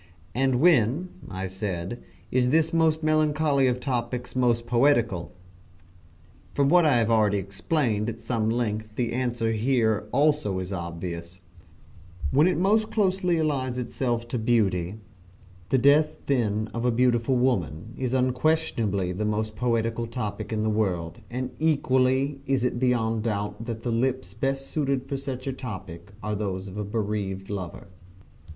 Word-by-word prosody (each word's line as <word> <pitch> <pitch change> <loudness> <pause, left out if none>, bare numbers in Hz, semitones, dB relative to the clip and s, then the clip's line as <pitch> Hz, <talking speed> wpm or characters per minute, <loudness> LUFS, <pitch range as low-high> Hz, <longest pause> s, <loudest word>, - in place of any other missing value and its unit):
"And 130 0 +2
when," 150 - +3 0.2
I 95 -1 -4
said, 95 +2 -4 0.3
"is 125 0 +2
this 160 +3 +2
most 160 -1 +2
melancholy 155 -3 +2
of 125 0 0
topics 125 -1 -3
most 120 -2 +2
poetical?" 120 -7 +2 1.2
From 140 -1 +3
what 175 +1 +5
I 150 - +5
have 115 -1 +2
already 105 -2 +3
explained 105 - -1
at 115 - -5
some 115 -1 -1
length 110 -2 -2
the 120 -1 -1
answer 120 -2 0
here 110 -2 +1
also 145 -8 +2
is 95 +1 -4
obvious 85 0 -6 0.9
"When 150 +5 +5
it 185 - +1
most 215 +5 +2
closely 185 -4 +1
allies 135 -5 0
itself 120 -1 -2
to 120 - -2
Beauty: 100 -6 +1 0.7
the 135 - +3
death 150 +4 +4
then 110 -5 0
of 115 - -3
a 125 - +3
beautiful 120 +1 +2
woman 110 - 0
is 130 -1 -2
unquestionably 125 - +1
the 95 +4 -3
most 105 0 -1
poetical 115 -1 0
topic 115 -3 -4
in 110 -1 0
the 110 - +1
world, 90 -6 -1
and 125 +1 -3
equally 135 -2 +2
is 135 -2 +1
it 125 -1 0
beyond 115 -3 +1
doubt 105 0 -3
that 115 -1 -5
the 120 - -1
lips 120 -4 -1
best 135 +4 -1
suited 140 -3 -1
for 140 - -3
such 135 -1 -5
topic 95 -6 -7
are 105 0 -2
those 100 -2 -3
of 95 - -9
a 105 - -2
bereaved 100 -2 -3
lover." 95 -4 -5
120 Hz, 150 wpm, -26 LUFS, 105-135 Hz, 1.2 s, what